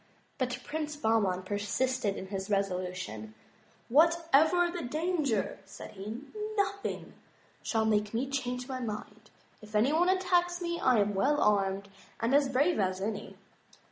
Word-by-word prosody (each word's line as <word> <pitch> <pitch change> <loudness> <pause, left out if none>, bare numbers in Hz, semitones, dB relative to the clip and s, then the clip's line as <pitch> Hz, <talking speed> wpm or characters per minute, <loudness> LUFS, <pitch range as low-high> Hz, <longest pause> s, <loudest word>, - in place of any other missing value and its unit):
But 250 -1 -1
Prince 305 -1 -4
Bahman 220 -8 +1
persisted 205 +3 -1
in 190 - -7
his 195 0 -4
resolution. 180 - -2 0.3
" - - -33
Whatever 335 +1 +4
the 350 0 -4
danger," 300 - -1
said 195 - -10
he, 215 +6 -7 0.3
"nothing 400 0 -2 0.5
shall 220 -1 0
make 210 -1 +1
me 240 +4 -1
change 250 -2 -3
my 260 -1 -4
mind. 215 -2 -6 0.3
If 215 0 -11
any 240 +8 +3
one 350 +3 +3
attacks 355 -2 +2
ine, 340 -1 -2
I 250 -4 +4
am 205 0 0
well 280 +10 +2
armed, 200 -1 +2 0.3
and 230 +3 0
as 280 -1 +4
brave 285 +5 +2
as 185 -1 0
any." 210 +1 -4
240 Hz, 145 wpm, -30 LUFS, 205-305 Hz, 0.5 s, Whatever